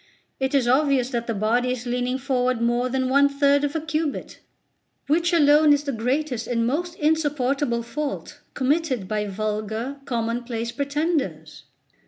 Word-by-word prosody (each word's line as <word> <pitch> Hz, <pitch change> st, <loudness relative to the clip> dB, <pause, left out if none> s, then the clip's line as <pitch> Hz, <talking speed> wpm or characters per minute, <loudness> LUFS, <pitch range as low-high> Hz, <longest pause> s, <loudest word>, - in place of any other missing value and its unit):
It 265 Hz, +1 st, 0 dB
is 260 Hz, -3 st, +2 dB
obvious 265 Hz, -1 st, +3 dB
that 235 Hz, -2 st, -2 dB
the 230 Hz, -, -1 dB
body 230 Hz, +5 st, +1 dB
is 250 Hz, -1 st, -4 dB
leaning 250 Hz, +1 st, -1 dB
forward 255 Hz, -2 st, 0 dB
more 240 Hz, +2 st, +1 dB
than 260 Hz, 0 st, 0 dB
one 280 Hz, +2 st, +4 dB
third 280 Hz, 0 st, +3 dB
of 290 Hz, +2 st, -1 dB
a -, -, +1 dB
cubit, 310 Hz, -1 st, -3 dB, 0.7 s
which 335 Hz, +4 st, +2 dB
alone 300 Hz, -2 st, +5 dB
is 290 Hz, 0 st, +1 dB
the 280 Hz, -, -2 dB
greatest 250 Hz, +1 st, -1 dB
and 230 Hz, -1 st, 0 dB
most 335 Hz, +8 st, -2 dB
insupportable 290 Hz, -6 st, 0 dB
fault 290 Hz, +4 st, -5 dB, 0.2 s
committed 270 Hz, -, 0 dB
by 210 Hz, 0 st, -1 dB
vulgar 215 Hz, +5 st, -3 dB
commonplace 235 Hz, -1 st, -2 dB
pretenders. 285 Hz, +3 st, -2 dB
260 Hz, 150 wpm, -24 LUFS, 235-290 Hz, 0.7 s, alone